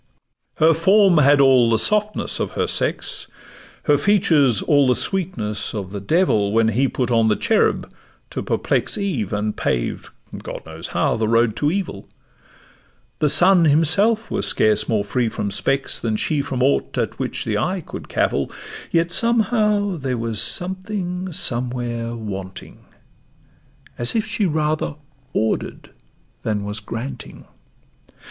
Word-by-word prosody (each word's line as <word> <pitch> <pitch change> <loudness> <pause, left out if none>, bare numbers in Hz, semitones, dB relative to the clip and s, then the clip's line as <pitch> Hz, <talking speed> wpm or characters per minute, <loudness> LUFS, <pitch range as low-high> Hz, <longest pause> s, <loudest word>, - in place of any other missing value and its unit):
Her 160 +1 +4
form 190 +1 +4
had 145 0 +5
all 130 -4 +5
the 115 - +3
softness 210 - 0
of - - -3
her - - 0
sex, - - -1 0.6
Her 145 -2 +3
features 150 - +3
all 145 -2 +3
the 125 - +3
sweetness 120 - -2
of 95 -3 -5
the 100 - -5
devil, 105 - +1
When 115 0 +3
he 125 +5 +1
put 125 -2 -2
on 115 -1 +3
the 105 - +3
cherub - - +1 0.4
to - - -4
perplex - - -1
Eve, 170 - -2
and 105 0 -2
paved - - -2 0.3
(God - - -8
knows - - -7
how) - - 0
the 110 -1 0
road 115 -1 +2
to 145 - +1
evil; 175 - -4 1.1
The 150 - +2
sun 180 +2 +6
himself 185 +10 +2
was 200 - -1
scarce 110 0 +2
more 110 -3 +1
free 115 +3 -1
from 100 -2 -4
specks 135 +5 0
Than 110 -2 -2
she 150 +6 0
from 130 -2 -2
aught 70 -1 0
at - - -2
which - - -3
the 105 -2 -1
eye 185 - -1
could - - -9
cavil; 70 0 0 0.4
Yet, 170 0 +1
somehow, 210 -3 +1
there 130 -4 -3
was 115 -2 -2
something 185 -1 -2
somewhere 120 -3 -2
wanting, 95 -4 -8 1.1
As 120 - +3
if 220 -1 +1
she 215 -2 0
rather 155 -1 -1 0.4
order'd 110 0 -2 0.5
than 105 -2 -2
was 105 +1 -2
granting. 120 +5 -7
135 Hz, 145 wpm, -21 LUFS, 110-185 Hz, 1.1 s, sun